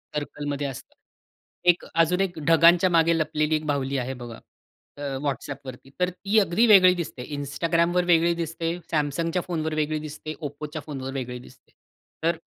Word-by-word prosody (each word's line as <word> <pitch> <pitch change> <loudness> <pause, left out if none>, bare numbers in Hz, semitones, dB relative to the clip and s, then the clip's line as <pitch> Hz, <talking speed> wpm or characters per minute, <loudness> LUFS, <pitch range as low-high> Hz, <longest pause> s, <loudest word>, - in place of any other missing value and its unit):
सर्कलमध्ये 145 -1 -3
असतं. 135 -3 -9 0.7
एक 175 - +3
अजून 165 +3 +2
एक 180 -4 -2
ढगांच्या 170 +2 +6
मागे 165 -1 +3
लपलेली 155 0 0
एक 155 0 -3
बाहुली 140 -1 -1
आहे 130 +1 -2
बघा 115 -1 -9 0.6
अ, - - -9 0.2
WhatsAppवरती. 135 -1 -5
तर 180 0 +2
ती 200 +4 +1
अगदी 200 +3 +3
वेगळी 185 -4 +8
दिसते, 150 -7 -5
Instagramवर 165 +5 0
वेगळी 170 0 +4
दिसते, 165 0 -3 0.2
Samsungच्या 165 +4 0
फोनवर 160 -2 -2
वेगळी 155 0 0
दिसते, 155 +1 -7
Oppoच्या 145 +1 -7
फोनवर 135 -3 -6
वेगळी 125 -2 -4
दिसते. 125 - -18 0.5
तर 165 0 +2
155 Hz, 150 wpm, -25 LUFS, 145-170 Hz, 0.7 s, वेगळी